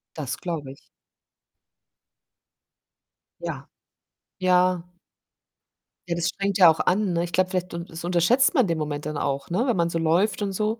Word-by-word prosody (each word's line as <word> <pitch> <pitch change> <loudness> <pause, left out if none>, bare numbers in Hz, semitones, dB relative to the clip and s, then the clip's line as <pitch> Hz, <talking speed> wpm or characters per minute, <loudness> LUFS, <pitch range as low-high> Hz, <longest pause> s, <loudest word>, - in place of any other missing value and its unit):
Das 140 -5 -4
glaube 160 -6 -5
ich. 140 - -14 2.6
Ja. - - -6 0.7
Ja. 180 -1 +2 1.2
Ja, 170 - -1
das 170 -1 0
strengt 195 -1 -2
ja 180 -4 +8
auch 160 - +2
an, 195 0 +1
ne? 170 0 0
Ich 175 -1 -6
glaube, 185 +1 +2
vielleicht 180 0 -2
un 170 0 -5
das 165 -1 -9
unterschätzt 180 - +3
man 255 - +3
den 165 -1 -1
Moment 150 -2 -4
dann 150 -1 -4
auch, 140 0 -2
ne, 190 +9 0
wenn 245 - +2
man 170 -1 +1
so 170 - -2
läuft 170 +7 +1
und 200 -1 -1
so. 215 +3 -1
175 Hz, 165 wpm, -24 LUFS, 165-190 Hz, 2.6 s, ja